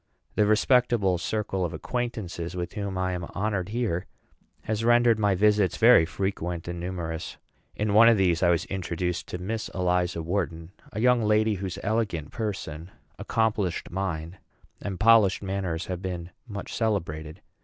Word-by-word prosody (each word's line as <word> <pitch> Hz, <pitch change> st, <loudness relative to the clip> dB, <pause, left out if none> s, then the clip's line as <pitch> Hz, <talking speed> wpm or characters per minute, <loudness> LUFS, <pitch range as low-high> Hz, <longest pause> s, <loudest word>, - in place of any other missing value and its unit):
The 105 Hz, -, +2 dB
respectable 110 Hz, -4 st, +3 dB
circle 100 Hz, -3 st, -2 dB
of 85 Hz, -1 st, -2 dB
acquaintances 90 Hz, -3 st, -4 dB
with 90 Hz, +2 st, -4 dB
which 105 Hz, -, -3 dB, 0.2 s
I 95 Hz, -, -1 dB
am 90 Hz, -1 st, -3 dB
honored 100 Hz, -2 st, -1 dB
here 105 Hz, -6 st, -1 dB, 0.6 s
has 110 Hz, +1 st, -2 dB
rendered 120 Hz, -1 st, +4 dB
my 105 Hz, -2 st, +3 dB
visits 105 Hz, 0 st, +3 dB
very 115 Hz, -8 st, +6 dB
frequent 90 Hz, -3 st, -3 dB
and 85 Hz, 0 st, -4 dB
numerous. 85 Hz, -1 st, -5 dB, 0.4 s
In 105 Hz, -1 st, -1 dB
one 115 Hz, +2 st, +8 dB
of 115 Hz, -, +5 dB
these 90 Hz, -3 st, +2 dB
I 90 Hz, -, +4 dB
was 85 Hz, 0 st, +2 dB
introduced 90 Hz, -2 st, -3 dB
to -, -, -5 dB
Miss 105 Hz, +5 st, -4 dB
Eliza 90 Hz, -2 st, 0 dB
Wharton 85 Hz, -2 st, -3 dB, 0.2 s
a 105 Hz, -, -5 dB
young 125 Hz, +1 st, +4 dB
lady 110 Hz, 0 st, +3 dB
whose 95 Hz, -2 st, -4 dB
elegant 100 Hz, -7 st, -1 dB
person, 95 Hz, -7 st, -4 dB, 0.3 s
accomplished 105 Hz, -5 st, -1 dB
mind, 90 Hz, -1 st, -3 dB, 0.4 s
and 95 Hz, -3 st, -5 dB
polished 110 Hz, -3 st, +5 dB
manners 95 Hz, -3 st, -2 dB
have 90 Hz, -1 st, -4 dB
been 90 Hz, -2 st, -5 dB, 0.2 s
much 100 Hz, -3 st, -6 dB
celebrated. 85 Hz, -7 st, -2 dB
95 Hz, 155 wpm, -26 LUFS, 85-110 Hz, 0.6 s, one